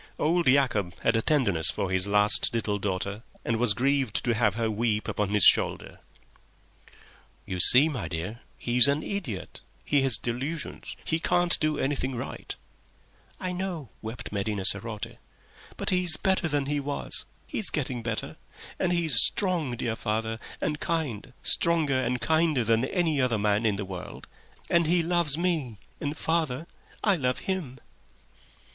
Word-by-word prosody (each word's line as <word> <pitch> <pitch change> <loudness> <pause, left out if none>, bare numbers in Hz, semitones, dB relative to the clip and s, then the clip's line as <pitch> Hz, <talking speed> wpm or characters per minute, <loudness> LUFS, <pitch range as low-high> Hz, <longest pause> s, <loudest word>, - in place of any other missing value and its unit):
Old 170 +1 +1
Yacob 125 -9 +1
had 115 - +2
a 115 - +2
tenderness 110 - +2
for 95 - -2
his 95 +1 +1
last 105 +3 +3
little 105 -3 -1
daughter, 100 +2 -3 0.2
and 115 - 0
was 115 -3 +4
grieved 135 -1 0
to 120 - +1
have 110 -3 +1
her 115 -1 -1
weep 110 0 -1
upon 105 -2 -2
his 105 -1 +2
shoulder. - - +4 1.5
"You 90 -1 -5
see, 125 - +7
my 125 - -4
dear, 90 +8 -5 0.2
he's 120 +2 +4
an 145 +2 0
idiot. 165 - -5 0.2
He 145 -2 +2
has 135 -5 +4
delusions; 135 +8 -4
he 160 - -1
can't 175 0 +2
do 155 -1 0
anything 135 -1 -2
right." 120 - -7 0.8
"I 185 - -3
know," 180 - -5
wept 110 +2 -6
Medina 100 -1 -3
sarote. 110 +3 +4 0.6
"But - - -1
he's 180 -3 +4
better 190 -2 0
than 145 -2 -1
he 145 +1 -1
was. 140 0 -3 0.2
He's 220 -8 +1
getting 130 -5 -3
better. 115 -1 -4 0.4
And 180 - 0
he's 165 -8 +5
strong, 175 -10 +1
dear 115 -2 -2
father, 110 0 -3 0.2
and 150 -1 -2
kind—stronger 145 0 0
and 125 0 -1
kinder 160 -4 +1
than 115 +2 +1
any 160 -2 0
other 125 -3 +1
man 105 +2 +1
in 105 - +1
the 100 0 -5
world. 90 -1 -8 0.4
And 170 -2 +2
he 170 +1 +2
loves 170 -3 +1
me—and, 150 - -4
father, 160 -3 -1 0.4
I 205 -3 +3
love 125 -3 -1
him." 175 -10 -4
125 Hz, 150 wpm, -26 LUFS, 110-160 Hz, 1.5 s, see